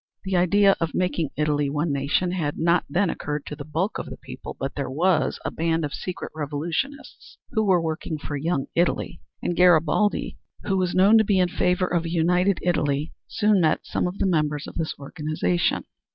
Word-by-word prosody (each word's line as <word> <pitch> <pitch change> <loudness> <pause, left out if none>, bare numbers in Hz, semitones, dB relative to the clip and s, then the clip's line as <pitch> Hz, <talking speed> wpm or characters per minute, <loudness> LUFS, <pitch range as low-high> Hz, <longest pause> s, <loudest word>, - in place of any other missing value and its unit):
The 190 -1 -2
idea 195 +3 +4
of 165 - -1
making 180 -4 0
Italy 145 -1 +1
one 150 +1 -1
nation 140 +6 0
had 160 -5 -2
not 170 +1 +2
then 180 +5 +1
occurred 150 0 -4
to 150 - -6
the 145 - -7
bulk 165 +8 -2
of - - -5
the - - -8
people, - - -9
but 135 0 -3
there 140 -2 -3
was 160 +4 +1
a - - -1
band 165 -1 0
of 145 - -5
secret 185 - -5
revolutionists 160 - -4
who 220 - +1
were 190 -4 +4
working 160 -1 -3
for 145 0 -5
"Young 145 -1 -1
Italy" 170 +1 0 0.2
and 175 - -1
Garibaldi, 180 +3 +3 0.2
who 195 - 0
was 180 -1 0
known 200 +4 +6
to - - +5
be 200 -2 +2
in 180 -1 +3
favor 180 +1 +1
of 175 -2 -1
a - - -3
united 180 +3 +2
Italy, 150 -3 0
soon 210 -2 +2
met 155 -2 +1
some - - -1
of 180 +2 -5
the - - 0
members 150 -5 0
of - - -9
this 160 -1 -3
organization. 140 - -1
165 Hz, 195 wpm, -24 LUFS, 150-185 Hz, 0.2 s, known